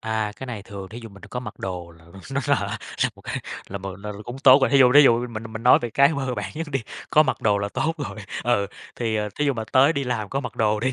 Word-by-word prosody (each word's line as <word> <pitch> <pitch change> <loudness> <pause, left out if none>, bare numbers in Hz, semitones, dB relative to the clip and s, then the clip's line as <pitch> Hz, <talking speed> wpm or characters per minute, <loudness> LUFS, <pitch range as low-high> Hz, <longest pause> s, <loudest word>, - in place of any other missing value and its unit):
À, 110 -1 -2
cái 130 - -7
này 115 -5 -6
thường 100 -2 -8
thí 115 - -9
dụ 115 - -8
mình 100 -1 -15
đã - - -13
có 125 - -3
mặc 105 -4 -8
đồ 90 -2 -5
là 80 - -20 0.3
nó 140 - 0
là - - 0 0.3
là - - +1
một - - -17
cái, - - -4 0.3
là 100 - -5
một 95 -1 -7
là 105 +2 -6
là 100 - -10
cũng 120 +2 -7
tốt 135 0 +7
rồi, - - +3
thí 140 - +5
dụ, 125 -1 +6
thí 145 - +9
dụ 120 -2 +4
mình 115 -1 -6
mình 110 +1 -6
nói 125 - +7
về 120 - -3
cái 140 +4 +5
mơ 135 -3 -2
bản 100 -2 -4
nhất 165 +1 -4
đi, 135 - +1 0.3
có 155 - +6
mặc 130 -5 -2
đồ 105 -2 +3
là 100 0 -2
tốt 160 +9 -1
rồi, 110 -7 -5 0.3
ừ, 120 -4 +2 0.3
thì 110 -2 -1 0.2
thí 150 - 0
dụ 140 - +2
mà 115 -3 -4
tới 140 +4 +6
đi 140 -2 -2
làm 115 -5 -2
có 135 - -2
mặc - - -7
đồ 105 -2 +1
đi 130 +2 0
115 Hz, 300 wpm, -24 LUFS, 105-130 Hz, 0.3 s, thí